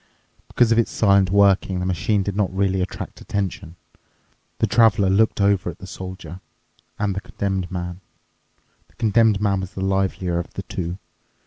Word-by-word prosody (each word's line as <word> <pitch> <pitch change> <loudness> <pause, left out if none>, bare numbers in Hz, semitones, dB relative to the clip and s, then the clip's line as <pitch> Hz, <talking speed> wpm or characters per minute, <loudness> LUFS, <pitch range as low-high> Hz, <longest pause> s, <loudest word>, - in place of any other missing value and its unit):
Because 120 -2 +2
of 115 - +4
its 115 - +1
silent 100 -3 +3
working, 100 -1 +3
the 90 - -2
machine 95 +3 0
did 100 0 -3
not 105 -2 0
really 95 0 0
attract 90 - -6
attention. 95 -4 -4 0.8
The - - +2
Traveler 110 -4 +4
looked 110 +3 +2
over 100 -2 +2
at 85 - -8
the - - -10
Soldier 95 -2 -8 0.6
and 105 -2 0
the 100 - -3
Condemned 95 -4 -3
Man. 90 0 -5 0.9
The - - -30
Condemned 110 -2 +3
Man 100 -2 +1
was 95 0 -6
the 95 - -2
livelier 95 -2 0
of 85 - -7
the - - -4
two. 85 0 -4
95 Hz, 165 wpm, -22 LUFS, 95-100 Hz, 0.9 s, of